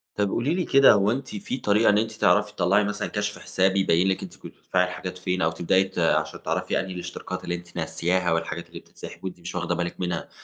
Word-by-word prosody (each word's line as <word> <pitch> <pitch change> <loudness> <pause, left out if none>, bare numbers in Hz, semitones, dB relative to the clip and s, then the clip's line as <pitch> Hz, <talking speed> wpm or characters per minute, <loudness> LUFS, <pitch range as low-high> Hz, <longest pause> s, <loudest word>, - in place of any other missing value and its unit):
طب 105 -1 +1
قولي 135 - 0
لي 180 -1 -1
كده، 135 -3 +7
هو 100 +1 +3
أنتِ 130 +2 -3
في 115 +5 -4
طريقة 105 -1 +3
إن 105 - +4
أنتِ 110 +1 0
تعرفي 105 -1 +2
تطَلَّعي 95 +3 +3
مثلًا 105 +1 -2
كشف 105 0 -3
حساب، 95 +2 +1
يبَيِّن 95 -1 +3
لكِ 95 - 0
أنتِ - - -9
كنتِ - - -11
بتدفعي 90 0 +1
الحاجات 90 0 -5
فين؟ 90 0 -2
أو 80 -1 +2
تبدئي 95 +3 +2
ت 95 -2 -6
عشان 85 - +1
تعرفي - - -1
أنهي 95 -1 -4
الاشتراكات 90 - -6
اللي 85 - -2
أنتِ 85 0 -11
ناسياها، 85 +2 0
والحاجات 85 0 -3
اللي - - -9
بتتسحب - - -12
وأنتِ 90 -1 -6
مش 85 +1 -8
واخدة 85 -1 -1
بالك 85 0 -3
منها. 90 -2 -3
95 Hz, 230 wpm, -25 LUFS, 85-105 Hz, -, كده